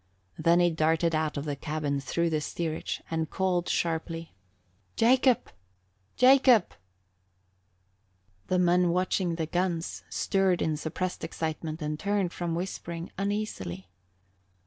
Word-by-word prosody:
Then 170 +1 +4
he 175 -1 +4
darted 165 +1 +2
out 155 -1 0
of 140 - -3
the 145 -2 -2
cabin 150 -1 -2
through 170 +5 0
the 155 -1 0
steerage 160 +1 -3
and 160 -1 -1
called 180 -2 0
sharply, 165 0 -2 0.6
"Jacob! 250 +1 +3 0.6
Jacob!" 255 -5 +5 1.7
The 185 - +1
men 180 0 +3
watching 180 0 +1
at - - -5
the 160 - -1
guns 175 0 -2
stirred 190 -2 +1
in 155 - 0
suppressed 165 +4 -4
excitement 160 0 -4
and 150 0 -3
turned 200 -2 0
from 170 -2 -2
whispering 170 -1 -5
uneasily. 195 - -3
170 Hz, 125 wpm, -28 LUFS, 160-185 Hz, 1.7 s, Jacob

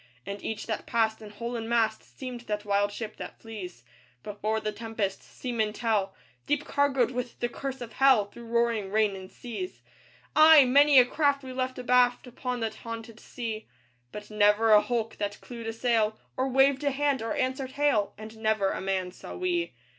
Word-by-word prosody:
And 200 0 -6
each 220 - -4
that 220 - -4
passed, 225 -1 +1
in 215 - -9
hull 235 +4 -5
and 225 -1 -4
mast, 225 -2 +2 0.2
Seemed 250 -2 -6
that 210 0 -3
wild 205 0 +2
ship 215 +1 -6
that - - -8
flees 190 - -8 0.4
Before 210 +1 -2
the 215 0 -2
tempest 210 -2 -3
seamen 225 -4 -3
tell 215 -4 0 0.3
Deep 295 0 0
cargoed 275 -4 +2
with 250 -1 -5
the 240 - 0
curse 265 +2 -6
of 230 -2 -7
Hell, 265 -6 +5
Through 235 +4 -12
roaring 230 -3 +1
rain 210 -1 +2
and 190 0 -10
seas. 255 +10 -7 0.5
Ay! 310 -2 +9
many 280 +2 +6
a 250 - +9
craft 285 +1 +1
we 260 -1 -7
left 255 0 -2
abaft 250 0 +3
Upon 250 0 -4
that 220 -1 -3
haunted 230 0 -8
sea; 225 -3 -6 0.4
But 210 0 -9
never 210 +1 +4
a 210 -1 +8
hulk 230 -2 -2
that 205 0 -3
clewed 235 -2 -8
a 225 - -2
sail, 225 -2 +1 0.2
Or 260 +1 0
waved 270 +1 +3
a 285 - +3
hand, 280 -1 0
or 225 0 -2
answered 260 0 -2
hail, 280 -9 +1
And 220 +1 -10
never 215 -3 +1
a - - -4
man 190 -1 -1
saw - - -10
we. 355 -2 -1
230 Hz, 190 wpm, -28 LUFS, 215-255 Hz, 0.5 s, Ay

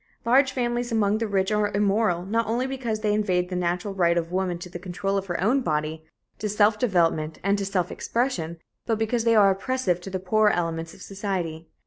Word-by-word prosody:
Large 260 +3 +4
families 240 -1 -1
among 215 -1 +2
the 225 - -1
rich 195 -1 0
are 210 -1 +1
immoral 200 -3 +1
not 225 +3 0
only 240 +3 0
because 250 -5 -3
they 210 -1 +1
invade 185 -4 +1
the 185 - -3
natural 180 +3 -1
right 175 -3 +2
of 165 0 -2
woman 185 -1 -1
to 175 - -8
the 175 0 -8
control 190 +2 -3
of 195 0 -2
her 175 -2 -2
own 240 +9 +2
body, 155 -4 -2 0.4
to 210 - -2
self 210 +1 +3
development 165 -8 +1
and 200 +1 +2
to 200 - -2
self 185 -3 -1
expression, 185 -10 -2 0.3
but 225 -2 +1
because 225 +1 0
they 230 -1 +4
are 200 -2 +6
oppressive 195 -3 -1
to 195 - -7
the 190 - -2
poorer 210 +3 +3
elements 165 -3 -2
of - - -12
society. 185 -5 -4
195 Hz, 210 wpm, -25 LUFS, 175-220 Hz, 0.4 s, are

